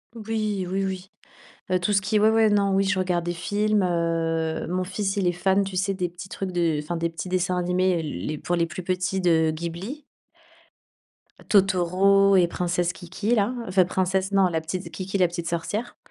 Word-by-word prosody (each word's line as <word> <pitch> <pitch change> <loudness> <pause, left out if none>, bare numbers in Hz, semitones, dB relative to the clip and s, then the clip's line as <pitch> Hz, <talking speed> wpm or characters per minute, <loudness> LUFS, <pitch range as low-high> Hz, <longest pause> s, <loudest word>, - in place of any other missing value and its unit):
Oui, 215 -3 -2
oui, 195 +1 -1
oui. 190 0 -4 0.6
Heu, 185 - +3
tout 180 +4 0
ce 200 - +3
qui 210 +3 0
est, - - +4
ouais, 215 - +5
ouais, 220 -1 +4
non, 200 -1 +3
oui, 195 - +3
je 195 -1 0
regarde 180 -2 0
des 175 - -1
films, 205 +4 0
heu, 165 -2 -1
mon 185 +1 -1
fils, 195 +2 -2
il 195 - +1
est 175 - +3
fan, 190 +3 +1
tu 195 -1 -6
sais, 195 +1 0
des 180 -1 -1
petits 175 +2 -10
trucs 190 -1 -4
de 170 -4 +1
enfin 170 +3 -3
des 170 0 -1
petits 165 +2 -6
dessins 180 0 0
animés 180 -1 +1
les 145 - -4
pour 175 - -2
les 170 -1 +1
plus 170 +4 -7
petits 185 +1 -1
de 160 -3 +3
Ghibli. 170 - -6 1.5
Totoro 195 0 +4
et 180 -2 +5
Princesse 175 0 -1
Kiki, 185 +7 -2
là 215 +3 +1
enfin, 185 -1 +3
Princesse 190 +2 0
non, 195 -1 +4
la 165 -2 -1
petite 170 +1 -5
Kiki 185 +4 -3
la 180 -2 +4
petite 170 0 -5
sorcière. 205 +8 -3
185 Hz, 200 wpm, -24 LUFS, 170-195 Hz, 1.5 s, ouais